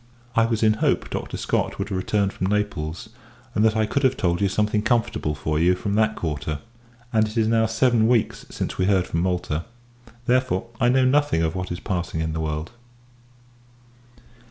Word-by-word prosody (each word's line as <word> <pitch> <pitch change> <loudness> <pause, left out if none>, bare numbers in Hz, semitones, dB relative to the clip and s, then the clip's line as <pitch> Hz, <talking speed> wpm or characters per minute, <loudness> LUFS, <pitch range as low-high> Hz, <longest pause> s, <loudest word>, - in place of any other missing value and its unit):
I 115 - +5
was 115 -1 0
in 110 -1 +5
hopes - - +1
Dr. - - -4
Scott - - -1
would - - -3
have 100 - -2
returned 100 +1 0
from 95 - -2
Naples; 100 -6 -2 0.4
and 105 - +2
that 110 0 +3
I 110 - +3
could 140 +6 -1
have 130 -1 +2
told 85 -1 0
you 100 - +3
something 105 +2 +1
comfortable 115 -10 0
for 75 +1 -1
you, 90 +2 +4
from 100 +2 -3
that 110 0 +2
quarter: 75 -2 -3 0.6
and 110 -1 +3
it 110 +2 -7
is 110 -1 +3
now 110 0 +3
seven 115 0 +3
weeks 120 -2 +1
since - - -4
we 90 - +3
heard 95 -2 +3
from 85 - -2
Malta. 90 -3 -1 0.6
Therefore, 125 -4 +1
I 120 - +4
know 130 +1 +4
nothing 140 - +3
of 80 - 0
what 90 -1 -4
is 90 - -3
passing 90 -4 -3
in 80 0 -1
the 80 - -3
world. 80 +1 -3
105 Hz, 195 wpm, -23 LUFS, 85-115 Hz, 0.6 s, I